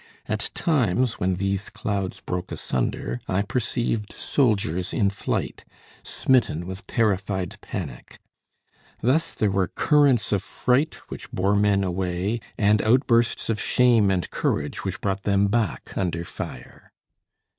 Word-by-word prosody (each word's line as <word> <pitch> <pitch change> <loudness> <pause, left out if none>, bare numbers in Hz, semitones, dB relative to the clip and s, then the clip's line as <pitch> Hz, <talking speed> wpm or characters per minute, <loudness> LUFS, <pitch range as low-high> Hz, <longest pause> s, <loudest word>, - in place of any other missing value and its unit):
At - - -2
times, 125 - +1
when 90 0 +1
these 100 +2 -1
clouds 100 -3 -3
broke 90 +1 -4
asunder, 60 0 -2
I 95 +2 +1
perceived 115 -1 -1
soldiers 100 - 0
in 100 -2 +2
flight, 100 - -3 0.4
smitten 120 - +1
with 95 +3 -7
terrified 95 -4 0
panic. 70 -10 -7 0.8
Thus 135 +8 +1
there 105 -2 +1
were 95 -1 +1
currents 145 -6 +3
of 100 -3 +2
fright 125 +8 +1
which - - -8
bore 100 +2 +1
men 100 -1 +3
away, 95 +4 -1 0.2
and 105 -1 +4
outbursts 120 0 +3
of 110 -2 -1
shame 120 -5 +4
and 90 -4 0
courage - - -1
which - - -4
brought 95 0 -1
them 100 0 +2
back 110 -4 -1
under 85 -2 -1
fire. - - -8
100 Hz, 130 wpm, -24 LUFS, 95-115 Hz, 0.8 s, and